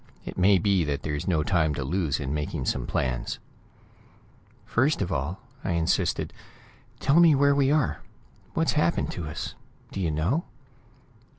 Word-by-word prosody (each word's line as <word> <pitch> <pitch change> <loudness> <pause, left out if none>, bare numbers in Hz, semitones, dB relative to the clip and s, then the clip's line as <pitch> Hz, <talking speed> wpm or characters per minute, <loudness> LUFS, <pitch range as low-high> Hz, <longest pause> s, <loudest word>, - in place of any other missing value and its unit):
It - - -6
may 95 +2 +5
be 95 -1 +2
that 70 -1 -2
there's 75 +2 -3
no 80 -5 +2
time 80 -4 +1
to 70 - -2
lose 80 0 0
in 65 +2 -3
making 75 -1 -3
some - - -1
plans." - - -1 1.3
"First 140 +6 +2
of 95 -2 -2
all," 80 +5 -2 0.2
I 90 - -1
insisted, 85 -1 0 0.7
"tell 140 +5 +4
me 165 -3 +7
where 140 +1 +4
we 140 -1 +3
are; 150 -3 +1 0.5
what's - - +2
happened - - +1
to 80 - -5
us. 80 +1 -5 0.4
Do - - -5
you 85 - +1
know?" 85 - 0
85 Hz, 160 wpm, -26 LUFS, 75-120 Hz, 1.3 s, me